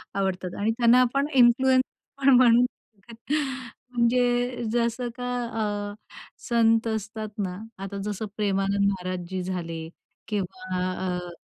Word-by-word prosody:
आवडतात. 190 -2 -2
आणि 210 +2 +2
त्यांना 240 +1 +6
आपण 275 +3 +1
इन्फ्लुअन्स 255 +1 +5 0.4
म्हणून 250 -2 +7 1.3
म्हणजे 245 0 +1
जसं 240 +1 0
का 245 0 -3 0.6
अ, - - -9 0.6
संत 230 -1 +3
असतात 220 0 -3
ना, 185 -3 -2 0.3
आता 195 +1 -5
जसं 210 +1 -3
प्रेमानंद 200 -1 +1
महाराजजी 185 -1 -4
झाले 175 -3 -4 0.5
किंवा 185 -2 -3 0.3
अ, 180 -1 -3
220 Hz, 105 wpm, -26 LUFS, 190-245 Hz, 1.3 s, म्हणून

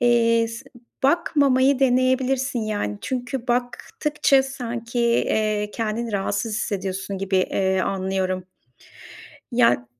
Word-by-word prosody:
eee, 230 -1 +3
s 230 +3 -8 0.4
bakmamayı 280 -4 +3
deneyebilirsin, 260 0 +2
yani. 205 - -2
Çünkü 250 0 -4
baktıkça 255 +3 +1
sanki, 240 -3 -4
eee, 215 -3 +1
kendini 225 0 -3
rahatsız 205 +2 -1
hissediyorsun 195 -3 -3
gibi, 195 0 -1 0.2
iii, 190 -1 +1
anlıyorum. 190 -1 -1 1.1
Ya, 115 - +5
ııı, 120 0 -2
230 Hz, 100 wpm, -23 LUFS, 200-255 Hz, 1.1 s, Ya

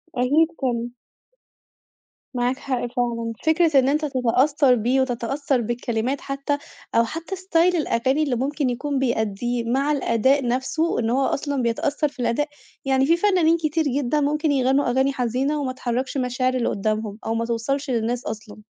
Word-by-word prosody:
أكيد 285 +6 +3
طبعًا. 240 -2 -1 1.4
معاك 250 +1 0
حق 260 -3 -2
فعلًا، 230 -2 -1
فكرة 320 -3 +4
إن 260 +1 +2
أنت 300 +2 +1
تتأثّر 265 +1 +3
بيه 245 +4 +1
وتتأثّر 260 +2 -1
بالكلمات 240 +3 -2
حتّى، 275 +1 -2 0.4
أو 230 - +5
حتّى 330 - -5
ستايل 360 -1 +2
الأغاني 275 -1 +1
اللي 275 -4 0
ممكن 275 +2 -1
يكون 270 +3 -2
بيأديه، 235 -1 -1
مع 275 +4 +1
الأداء 270 -1 +2
نفْسه 265 +7 0
إن 230 -1 0
هو 265 +2 +2
أصلًا 285 -1 -1
بيتأثّر 280 +6 0
في 280 - -14
الأداء، 245 +4 0 0.4
يعني 265 0 +3
في 335 +4 +3
فنانين 345 -4 +3
كتير 320 0 0
جدًا 285 +1 0
ممكن 300 +1 +1
يغنوا 270 +1 +2
أغاني 265 +3 +2
حزينة، 260 +4 -1
وما 260 -2 -2
تحركش 255 +2 -3
مشاعر 255 0 0
اللي 250 -2 0
قدّامهم، 215 0 -2
أو 225 - -1
ما 230 0 -1
توصلش 270 +5 -2
للناس 240 0 -1
أصلًا. 215 0 -7
265 Hz, 155 wpm, -23 LUFS, 240-290 Hz, 1.4 s, أو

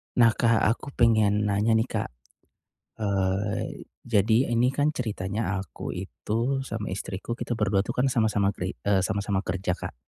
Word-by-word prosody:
Nah 115 -2 +6
Kak, 115 0 +2
aku 115 +5 +1
pengen 110 -3 +3
nanya 105 +3 +2
nih 110 +2 +2
Kak. - - -2 0.9
Eee, 100 0 -1 0.2
jadi 115 +3 +2
ini 120 +2 +3
kan 145 +2 +2
ceritanya 105 -4 -2
aku 95 -1 -6
itu, 115 +8 -2
sama 110 -7 -4
istriku 95 +3 -5
kita 120 0 -3
berdua 100 -3 +2
itu 120 +5 -3
kan 135 +2 +2
sama-sama 105 -4 +2
kri 90 -1 -5
e 100 -1 +3
sama-sama 100 +1 0
kerja 95 -1 -2
Kak. 90 - -6
105 Hz, 155 wpm, -26 LUFS, 100-115 Hz, 0.9 s, Nah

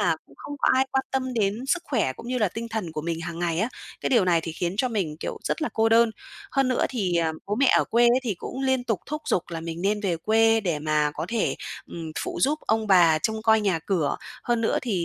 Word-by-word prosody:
là - - +2
cũng - - -20
không 290 - -7
có - - +2
ai 260 +1 +4
quan 265 0 +1
tâm 260 -1 -2
đến 220 +4 0
sức 350 +5 +1
khỏe 225 - 0
cũng 230 - -10
như 250 0 -1
là 210 -4 +2
tinh 230 +5 -6
thần 215 -8 -4
của 155 - -4
mình 165 0 -3
hằng 170 0 -5
ngày 170 -2 -1
á, 220 - +1 0.3
cái - - -2
điều 230 -7 +4
này 170 -2 +3
thì 165 0 -5
khiến 175 +2 -2
cho 255 +4 +1
mình, 185 -10 -2
kiểu, - - -4
rất - - -1
là 305 - 0
cô 225 0 +2
đơn. 230 0 +5 0.4
Hơn 270 -1 +2
nữa 255 - +1
thì, 190 -9 -1
à, 165 -1 +1
bố 205 - -1
mẹ 265 +4 +3
ở - - +2
quê 235 +1 +3
á 240 +1 +5
thì 225 -6 -1
cũng 260 - -7
liên 260 -2 +1
tục 225 -7 -1
thúc 300 +1 -4
giục 180 - +2
là 165 -1 -4
mình 165 0 -5
nên 205 +2 +1
về 185 -5 0
quê 225 +4 +3
để 170 -7 -1
mà 150 -1 +1
có - - -3
thể, 230 -1 0 0.3
ừm, 165 -2 -7
phụ - - -4
giúp 295 +3 +2
ông 220 0 +1
bà 175 -5 +6
trông 220 +7 -2
coi 220 -1 +4
nhà 195 -5 +1
cửa, 170 -7 0 0.3
hơn 240 -1 +1
nữa 225 - +1
thì 200 -9 -1
215 Hz, 270 wpm, -25 LUFS, 170-240 Hz, 0.4 s, bà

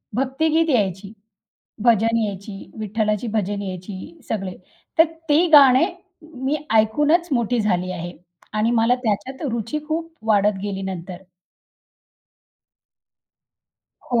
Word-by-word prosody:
भक्तिगीत 315 +6 +1
यायची. 195 - 0 0.7
भजन 230 0 +4
यायची, 200 0 -7
विठ्ठलाची 215 +1 -1
भजन 205 -1 -1
यायची, 190 - -7
सगळे. 195 -4 -3 0.4
तर 325 - +9 0.2
ती 315 +4 +4
गाणे 275 +1 +8 0.4
मी 295 -2 -3 0.2
ऐकूनच 295 +11 +3
मोठी 240 -1 +1
झाली 185 -3 0
आहे 175 0 -6 0.4
आणि 220 +2 +2
मला 230 +1 +3
त्याच्यात 225 +7 -2
रुची 235 +5 -2
खूप 330 +1 -3 0.2
वाढत 205 -1 +3
गेली 200 -1 -3
नंतर. 185 -1 -5 2.9
हो. 240 -2 +1
220 Hz, 105 wpm, -22 LUFS, 200-270 Hz, 2.9 s, तर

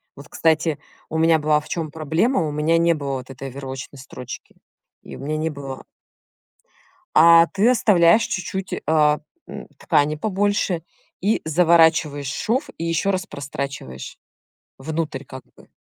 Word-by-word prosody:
Вот, 140 +1 -12
кстати, 160 -2 +1 0.3
у 160 - -3
меня 160 0 +4
была 150 0 +2
в 150 - -13
чём 160 -3 -3
проблема: 160 - 0
у - - -3
меня 155 +3 +1
не 170 0 +3
было 140 -3 -4
вот 125 +1 -10
этой 135 +1 -7
оверлочной 135 +1 -8
строчки, 125 -1 -10 0.5
и - - -10
у - - -13
меня 150 +3 -3
не 160 +1 -1
было 135 -3 -8 1.3
А, 165 +1 +7
ты 205 +5 +2
оставляешь 205 -3 +4
чуть-чуть, 190 0 -4
э, - - -2
м, 150 - -1
ткани 150 +1 +1
побольше, 195 -2 -1 0.4
и 210 +4 +1
заворачиваешь 160 -3 +3
шов, 235 - -1
и 165 - -4
ещё 165 +4 0
раз 185 0 -2
прострачиваешь 140 - -7 0.6
внутрь, 155 -1 -4
как 130 0 -10
бы. - - -19
160 Hz, 150 wpm, -22 LUFS, 140-170 Hz, 1.3 s, А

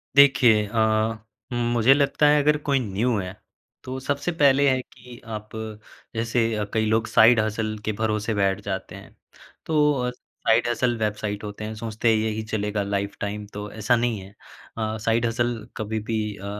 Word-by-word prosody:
देखिए 125 -6 +6
अ, 110 0 +1 0.3
मुझे 120 +1 +3
लगता 140 +1 +2
है 150 0 +5
अगर 150 +1 +3
कोई 140 -1 +3
न्यू 115 +1 0
है, 90 -2 -4 0.5
तो 130 +1 -5
सबसे 145 +5 -2
पहले 140 -3 +4
है 130 -1 +2
कि 120 -1 -15 0.2
आप 105 0 -8 0.7
जैसे 115 +1 +1 0.3
कई 110 -1 +1
लोग 110 +1 +1
साइड 115 +1 +6
हसल 110 0 -1
के 110 - 0
भरोसे 110 +1 -1
बैठ 100 -1 +1
जाते 95 -1 -4
हैं। - - -13 0.5
तो 150 -2 +3 0.2
अ, - - 0 0.4
साइड 115 +2 +4
हसल 120 +1 +1
वेबसाइट 105 -1 -2
होते 105 0 -7
हैं 110 +1 -4
सोचते 110 +1 -1
हैं 110 - +4
यही 110 0 -1
चलेगा 105 -1 -2
लाइफटाइम 100 +1 -3
तो 105 0 -6
ऐसा 110 +3 +1
नहीं 115 -2 0
है। 95 0 -11 0.5
अ, 110 -1 -2
साइड 115 +1 +1
हसल 120 +1 0 0.2
कभी 110 0 -2
भी 110 - 0 0.2
अ, 100 - -9
110 Hz, 170 wpm, -24 LUFS, 105-120 Hz, 0.7 s, देखिए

